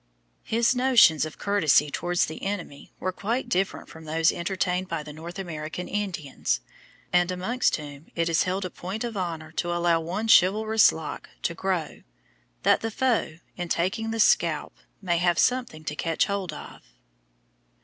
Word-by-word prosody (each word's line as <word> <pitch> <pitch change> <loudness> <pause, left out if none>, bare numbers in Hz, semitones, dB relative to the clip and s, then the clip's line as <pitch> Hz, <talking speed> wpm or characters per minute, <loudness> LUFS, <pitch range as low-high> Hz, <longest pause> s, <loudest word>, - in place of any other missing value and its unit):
His 235 +3 +1
notions 245 - +5
of 155 - -12
courtesy 155 -8 +3
towards 175 +3 0
an 160 - -7
enemy 185 -8 -5
were 185 - -1
quite 225 +7 -2
different 190 +2 -1
from 160 0 -12
those 160 +1 +2
entertained 180 +1 -1
by 165 -3 -3
the 150 0 -9
North 170 +4 -8
American 170 -1 -5
Indians, 180 - -2 0.5
and 180 0 +4
amongst 185 +8 0
whom 145 0 -9
it 165 -1 +1
is 165 0 +2
held 185 +1 -1
a 180 - -5
point 195 +6 -5
of 235 -2 -4
honour 165 -4 -4
to 175 - 0
allow 175 -1 +2
one 185 +7 -3
"chivalrous 215 +2 +5
lock" 160 -2 -7
to - - 0
grow, 180 -2 -2 0.6
that - - +4
the 225 - -2
foe, 225 -8 0 0.2
in 175 -1 -5
taking 190 +8 0
the 225 0 -3
scalp, 165 -7 +2 0.3
may 175 -2 +1
have 175 -1 +2
something 245 -11 +1
to 150 -1 -4
catch 165 +1 +1
hold 200 -4 -3
of. 150 - -10
175 Hz, 165 wpm, -26 LUFS, 160-200 Hz, 0.6 s, notions